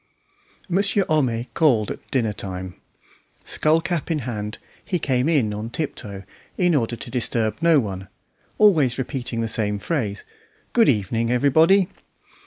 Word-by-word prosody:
Monsieur 200 +1 +1
Homais 125 -7 +1
called 125 -10 +2
at - - -9
dinner 115 -5 0
time. 95 -2 -5 0.7
Skull 155 +2 +2
cap 175 -2 -3
in 165 - +1
hand, 105 -3 -4 0.3
he 180 - -1
came 130 -2 0
in 130 -10 +2
on 105 +2 -5
tiptoe, 105 -9 -5 0.3
in 180 -2 +3
order 120 -5 0
to 120 +1 -9
disturb 115 -3 +1
no 165 -3 +5
one, 95 -5 -4 0.5
always 155 - +4
repeating 125 -3 -3
the 115 - -1
same 105 -2 0
phrase, 105 - -2 0.5
"Good 230 -2 +5
evening, 115 +1 0
everybody." 160 +9 +4
125 Hz, 140 wpm, -22 LUFS, 110-160 Hz, 0.7 s, no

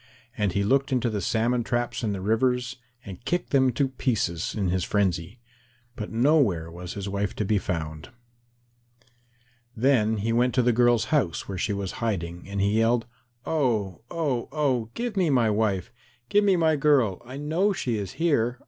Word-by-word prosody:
And 105 -4 0
he 100 - +1
looked 135 +6 +2
into 125 -2 +1
the 105 -2 -2
salmon 120 +3 +1
traps 120 +1 -2
in 110 - 0
the 95 -2 -4
rivers, 125 +4 0 0.3
and 95 +3 -9
kicked 175 +6 -2
them 130 -2 +4
to 140 +3 +1
pieces 110 - -1
in 100 -4 0
his 90 0 0
frenzy. 95 +1 -1 0.6
But 105 -3 -5
nowhere 115 - +2
was 90 +1 -7
his 100 -1 -5
wife 100 0 -2
to 105 - -2
be 105 +1 +2
found. 80 -4 -4 1.7
Then 110 -3 +3
he 110 +3 -1
went 125 +2 +2
to 125 - +3
the 120 0 +3
girl's 120 -1 +3
house, 125 - 0
where 95 -2 -5
she 105 - 0
was 100 -2 -3
hiding, 90 -5 -3
and 100 0 -3
he 100 +3 +2
yelled, 115 +1 +2 0.4
"Oh, 110 - 0
oh, 145 -8 -2
oh, 135 -7 0
give 240 -2 -3
me 185 -4 +2
my 120 -6 +3
wife. 105 -4 0 0.4
Give 205 +1 +4
me 195 -2 +4
my 160 -2 +3
girl. 135 - +2
I 130 +3 -9
know 160 +8 +1
she 120 - -2
is 100 -2 -5
here. 125 -8 +1
115 Hz, 180 wpm, -26 LUFS, 100-130 Hz, 1.7 s, them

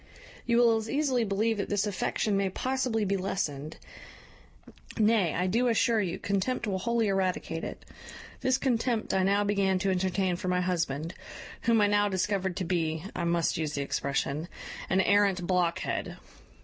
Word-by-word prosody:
You 235 -1 +3
will 235 -2 +5
as 220 0 -5
easily 275 -5 +1
believe 220 +2 0
that 200 - -3
this 205 0 +1
affection 205 +1 -1
may 195 -1 +1
possibly 255 0 -1
be 195 0 0
lessened; 155 -6 -3 1.2
nay, 215 -6 +3
I 180 - 0
do 230 +7 +2
assure 230 -1 +3
you, 180 -4 -2
contempt 200 +6 -1
will 195 -3 -1
wholly 235 +1 +1
eradicate 185 -4 -1
it. - - -7 0.5
This 260 0 +2
contempt 245 -3 0
I 190 - +3
now 200 +2 +2
began 200 -2 +1
to 190 +1 0
entertain 185 -1 0
for 185 - -5
my 180 0 +1
husband, 165 -3 -1 0.5
whom 230 -2 +3
I - - +5
now 205 0 +2
discovered 190 -1 -1
to 190 - -1
be 160 -3 -1
I 175 - -2
must 170 -1 +1
use 155 -2 -2
the 140 - -1
expression 140 +3 -2 0.4
an 190 0 +3
arrant 200 -2 +3
blockhead. 175 -2 -1
195 Hz, 165 wpm, -29 LUFS, 180-220 Hz, 1.2 s, will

